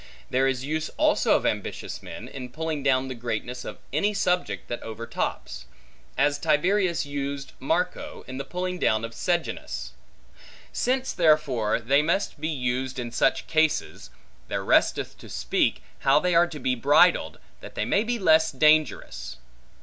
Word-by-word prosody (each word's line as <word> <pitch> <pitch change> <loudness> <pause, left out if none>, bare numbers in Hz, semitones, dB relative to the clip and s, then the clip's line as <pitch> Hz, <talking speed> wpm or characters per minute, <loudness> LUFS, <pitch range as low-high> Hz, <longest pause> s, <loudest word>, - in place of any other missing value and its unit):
There 130 +1 +3
is 135 0 -1
use 155 +2 -2
also - - +3
of - - 0
ambitious - - -3
men, - - -9
in 130 -2 -8
pulling 160 +2 -3
down 135 -1 +2
the 130 - -4
greatness 120 +1 -4
of - - -7 0.2
any 205 +8 +1
subject 180 -2 0
that 120 - -4
overtops; 110 - -4 0.5
as 145 +1 +2
Tiberius 170 +3 +2
used 140 -1 -4
Marco, 165 +7 -2
in 130 +1 -6
the - - -2
pulling 180 +4 -4
down 110 -5 +2
of 115 - -8
Sejanus. 170 +8 -2 0.8
Since, 260 +1 0
therefore, 150 -11 +2
they 135 +5 +3
must 160 -1 -1
be 155 - -1
used 130 -2 -2
in 120 -2 -4
such 130 +2 +1
cases, 155 -1 0 0.4
there - - -3
resteth - - +2
to - - -12
speak, - - 0 0.2
how 140 +2 +4
they 180 +2 0
are 170 +1 +5
to 155 -4 -8
be 130 0 0
bridled, 145 +8 +4 0.2
that - - -11
they - - -1
may 200 - +2
be 240 +1 -1
less 160 -5 +4
dangerous. 150 - +1
145 Hz, 155 wpm, -26 LUFS, 130-165 Hz, 0.8 s, are